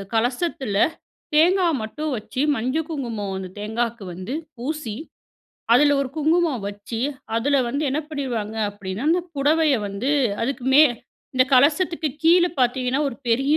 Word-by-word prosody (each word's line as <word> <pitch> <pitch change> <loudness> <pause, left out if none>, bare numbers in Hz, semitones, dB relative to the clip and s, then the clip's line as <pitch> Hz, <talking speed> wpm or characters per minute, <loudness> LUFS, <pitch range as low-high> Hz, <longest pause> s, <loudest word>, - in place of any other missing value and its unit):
கலசத்தில 245 - -1 0.6
தேங்கா 355 +4 +4
மட்டும் 295 +8 -4
வச்சு 235 +4 -4
மஞ்சள் 260 +8 -1
குங்குமம் 230 -10 -4
அந்த 185 -1 -6
தேங்காக்கு 225 +1 -2
வந்து 185 +9 -6 0.2
பூசி, 260 -3 -4 0.8
அதில 290 +2 +5
ஒரு 260 - -5
குங்குமம் 315 - +1
வச்சு, 205 +3 -6 0.4
அதில 280 +5 +2
வந்து 280 +5 -2
என்ன 290 - 0
பண்ணிருவாங்க 235 -7 -3
அப்பிடின்னா, 200 +3 -6
அந்த 350 +2 +2
புடவைய 300 +1 +3
வந்து 200 +8 -2 0.3
அதுக்குமே 265 +3 +4 0.5
இந்த 255 - +5
கலசத்துக்கு 310 +4 +3
கீழ 345 +2 +6 0.2
பாத்தீங்கன்னா, 250 +2 +1
ஒரு 235 - -7
பெரிய 270 +6 +3
260 Hz, 130 wpm, -23 LUFS, 225-305 Hz, 0.8 s, கீழ